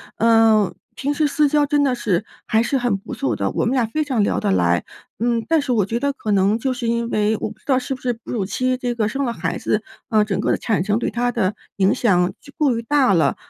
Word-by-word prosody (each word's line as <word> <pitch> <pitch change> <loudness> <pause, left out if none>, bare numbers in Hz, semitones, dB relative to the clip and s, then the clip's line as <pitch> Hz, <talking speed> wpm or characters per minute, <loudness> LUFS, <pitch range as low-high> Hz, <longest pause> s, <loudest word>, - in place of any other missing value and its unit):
啊， 225 -3 +4 0.2
平 285 +1 -1
时 300 0 +1
私 295 +1 +2
交 295 0 +3
真 290 0 +2
的 265 -2 +2
是 210 -5 -1 0.2
还 220 +1 +2
是 270 +3 0
很 245 -5 0
不 195 - -9
错 125 -5 -1
的， 100 -1 -1
我 - - -1
们 240 - +1
俩 250 -3 +2
非 305 +8 -1
常 245 -7 +1
聊 - - 0
得 - - -1
来。 90 -1 +2 0.4
嗯， 235 0 0
但 325 -2 +3
是 265 - -3
我 210 -4 +2
觉 230 +4 -2
得 280 +1 0
可 215 -6 -4
能 200 +2 +3
就 260 +3 -1
是 245 -2 -4
因 235 0 0
为 215 +1 +1
我 - - -2
不 215 - -15
知 - - -31
道 265 -3 +2
是 265 +1 -2
不 255 - -7
是 245 -1 0
哺 230 -1 -11
乳 215 -5 -1
期 255 +6 0
这 245 -1 -3
个 215 -2 0
生 270 +6 -2
了 235 - -2
孩 165 -3 -3
子， 210 0 -1 0.2
啊， 215 -2 +3
整 205 -3 -2
个 - - -1
的 - - +1
产 210 -6 0
生 210 +1 +1
对 235 - -2
她 245 +1 0
的 210 -4 0 0.2
影 195 +4 +3
响 185 -8 +2
就 285 - -15
过 280 -5 +2
于 230 - -2
大 265 -3 +3
了。 160 -6 +2
230 Hz, 295 characters per minute, -21 LUFS, 205-255 Hz, 0.4 s, 啊